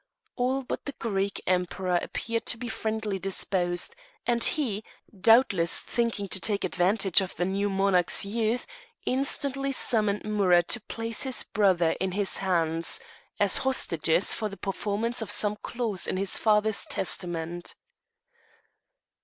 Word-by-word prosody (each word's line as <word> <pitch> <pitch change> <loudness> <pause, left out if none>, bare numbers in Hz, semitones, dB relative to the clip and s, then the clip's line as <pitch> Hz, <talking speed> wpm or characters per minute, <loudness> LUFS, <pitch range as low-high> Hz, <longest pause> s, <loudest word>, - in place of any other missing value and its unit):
All 260 +2 -1
but - - -6
the 285 - -5
Greek 200 -5 -3
Emperor 180 0 0
appeared 230 0 -4
to 235 - 0
be 245 +1 -6
friendlily 220 -3 -3
disposed, 185 - 0 0.3
and 235 -1 +1
he, 235 - 0 0.3
doubtless 195 -4 +5
thinking 230 -4 -2
to 190 - 0
take 200 +1 -1
advantage 190 +1 +2
of 185 - -6
the 175 - -1
new 200 +2 -1
monarch's 195 -2 +3
youth, 225 +3 -1 0.4
instantly 275 +1 0
summoned 215 -5 +1
Amurath 190 -5 +2
to 240 - +1
place 225 +1 -3
his 260 -2 +3
brothers 185 -5 +1
in 190 -1 -1
his 200 0 +2
hands, 165 -3 +1 0.4
as 205 -2 +4
hostages 170 -9 +1
for 215 -2 -3
the 200 - -10
performance 210 +4 -2
of 220 - -5
some 210 0 +1
clause 220 -5 -3
in - - -2
his 195 0 0
father's 215 -1 +2
testament. 175 -2 -3
200 Hz, 135 wpm, -26 LUFS, 185-230 Hz, 0.4 s, doubtless